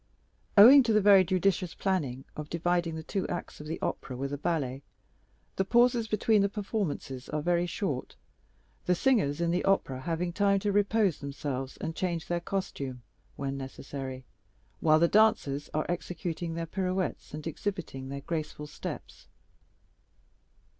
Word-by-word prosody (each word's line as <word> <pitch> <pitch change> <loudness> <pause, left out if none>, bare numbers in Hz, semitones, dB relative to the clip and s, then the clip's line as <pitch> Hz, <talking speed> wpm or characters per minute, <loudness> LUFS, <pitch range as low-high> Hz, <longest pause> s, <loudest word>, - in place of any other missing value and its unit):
Owing 255 +8 +10
to 230 -3 +1
the 215 - +5
very 200 -2 +7
judicious 185 0 0
plan 145 -10 -1
of 150 0 -6
dividing 170 0 0
the 160 - -6
two 195 +4 -2
acts 175 - -5
of 150 - -9
the 160 - -3
opera 125 - -3
with 140 +2 -3
a - - -2
ballet, 140 -5 -1 0.8
the 190 - +3
pauses 240 +2 +3
between 215 0 +3
the 200 - +2
performances 195 - -3
are 150 0 -2
very 175 +1 +2
short, 160 - -3 0.7
the 180 - +4
singers 185 - +2
in 170 -1 +1
the 180 - 0
opera 195 -9 +1
having 170 +3 -2
time 200 +1 +3
to 205 0 0
repose 205 -2 +2
themselves 140 -2 -4
and 160 0 -4
change 170 -3 -2
their 175 0 -1
costume, 140 -9 -4 0.3
when 135 0 -3
necessary, 130 -1 -7 0.5
while 155 -1 +5
the 170 +2 +4
dancers 160 -9 +3
are 155 - -1
executing 175 -1 -3
their 165 0 -2
pirouettes 185 -2 -2
and 150 - -7
exhibiting 165 -6 -4
their 140 0 -5
graceful 155 0 -4
steps. 150 - -8
170 Hz, 155 wpm, -29 LUFS, 145-195 Hz, 0.8 s, Owing